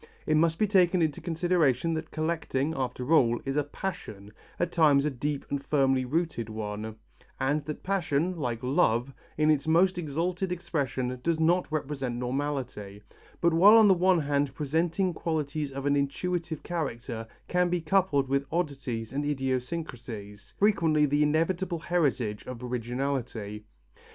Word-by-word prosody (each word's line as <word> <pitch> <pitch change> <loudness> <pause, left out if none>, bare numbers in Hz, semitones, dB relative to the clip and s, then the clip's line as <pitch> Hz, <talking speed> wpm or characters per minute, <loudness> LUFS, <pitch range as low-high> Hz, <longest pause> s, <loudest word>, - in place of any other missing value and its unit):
It 155 - +2
must 165 +1 +3
be 215 - +3
taken 185 -3 +3
into 155 -3 -1
consideration 165 -4 +1
that 160 0 -4
collecting, 155 -2 -1
after 130 +2 -2
all, 120 -6 +4
is 135 0 -2
a 150 - +2
passion, 110 - -6 0.3
at 175 0 0
times 150 -5 +4
a 150 - +1
deep 140 +2 -3
and 140 -1 -2
firmly 135 -3 +2
rooted 150 -5 -1
one, 110 0 -5 0.4
and 145 +3 +1
that 150 0 -6
passion, 180 -2 0
like 120 -7 -3
love, 130 -2 +2 0.2
in 155 0 +4
its 150 0 0
most 175 +3 +3
exalted 175 +4 -2
expression 130 -7 -2
does 165 +3 0
not 170 +2 +2
represent 140 -5 -2
normality, 125 -6 -4 0.4
but 170 -1 +3
while 200 +7 +8
on 220 -2 +7
the 195 - +7
one 180 -1 +3
hand 140 -2 0
presenting 165 +5 0
qualities 155 -3 -2
of 135 +1 -5
an 145 0 +3
intuitive 165 +3 -2
character, 120 -8 -4 0.2
can 180 0 +2
be 175 0 0
coupled 160 -5 +2
with 140 +1 0
oddities 135 -9 -3
and 145 +2 -1
idiosyncrasies, 125 -6 -4
frequently 165 -7 +3
the 145 +1 +1
inevitable 170 +4 +1
heritage 140 -11 0
of 125 -1 -7
originality. 120 -3 -3
145 Hz, 150 wpm, -28 LUFS, 130-170 Hz, 0.4 s, while